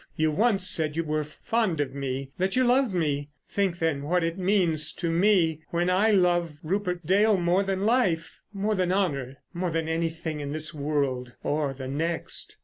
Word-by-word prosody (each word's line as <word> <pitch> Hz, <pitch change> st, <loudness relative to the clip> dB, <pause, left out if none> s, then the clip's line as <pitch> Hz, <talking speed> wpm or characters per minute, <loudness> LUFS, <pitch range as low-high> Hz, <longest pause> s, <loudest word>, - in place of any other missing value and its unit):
You 155 Hz, 0 st, +1 dB
once 195 Hz, +2 st, +2 dB
said 160 Hz, -5 st, +1 dB
you 165 Hz, -, +1 dB
were 155 Hz, -1 st, -1 dB
fond 180 Hz, +3 st, -1 dB
of 145 Hz, -2 st, -1 dB
me, 135 Hz, -1 st, -4 dB
that 190 Hz, +1 st, 0 dB
you 255 Hz, -, +4 dB
loved 250 Hz, -1 st, +3 dB
me. 145 Hz, -5 st, -1 dB, 0.2 s
Think 195 Hz, -4 st, 0 dB
then 160 Hz, -4 st, 0 dB
what 175 Hz, +5 st, +1 dB
it 165 Hz, 0 st, -1 dB
means 180 Hz, -5 st, +1 dB
to 170 Hz, -2 st, -2 dB
me 170 Hz, -3 st, +3 dB
when 175 Hz, +1 st, +1 dB
I 200 Hz, +4 st, +3 dB
love 175 Hz, -5 st, +2 dB
Rupert 180 Hz, 0 st, -2 dB
Dale 205 Hz, +4 st, +4 dB
more 175 Hz, +2 st, +2 dB
than 195 Hz, 0 st, -1 dB
life—more 210 Hz, -1 st, 0 dB
than 185 Hz, -3 st, 0 dB
honour—more 175 Hz, 0 st, -2 dB
than 165 Hz, -1 st, -1 dB
anything 160 Hz, -1 st, -2 dB
in 145 Hz, 0 st, -4 dB
this 155 Hz, +1 st, -4 dB
world 140 Hz, -4 st, -2 dB
or 145 Hz, -2 st, -1 dB
the 130 Hz, 0 st, -6 dB
next. 160 Hz, +5 st, -3 dB
170 Hz, 175 wpm, -26 LUFS, 150-190 Hz, 0.2 s, you